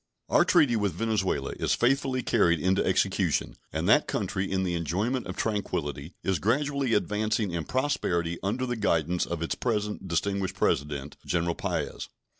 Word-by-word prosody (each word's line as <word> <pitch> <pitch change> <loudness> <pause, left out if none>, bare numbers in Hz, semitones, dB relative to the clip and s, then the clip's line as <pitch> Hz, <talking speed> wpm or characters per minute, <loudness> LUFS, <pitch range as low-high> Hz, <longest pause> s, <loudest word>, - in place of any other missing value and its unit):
Our - - +5
treaty 125 -5 +4
with 105 -4 0
Venezuela 95 -11 -1
is - - +2
faithfully 130 +1 +1
carried 85 -7 +3
into 95 +4 +2
execution, - - +1 0.2
and - - -2
that - - +5
country, 95 0 -2
in 95 -1 +1
the 90 -2 -1
enjoyment 100 +10 -1
of - - -6
tranquillity, 85 -8 -2
is 95 -4 0
gradually 135 - +1
advancing 105 -1 0
in 85 -2 -3
prosperity 85 -11 0
under 105 +7 -1
the 120 -1 -2
guidance 85 -4 +1
of 85 -1 -3
its 80 - -1
present 105 -4 -2
distinguished 95 +2 -1
President, 75 -5 -1
General 85 0 0
Paez. - - -3
95 Hz, 155 wpm, -28 LUFS, 85-115 Hz, 0.2 s, Our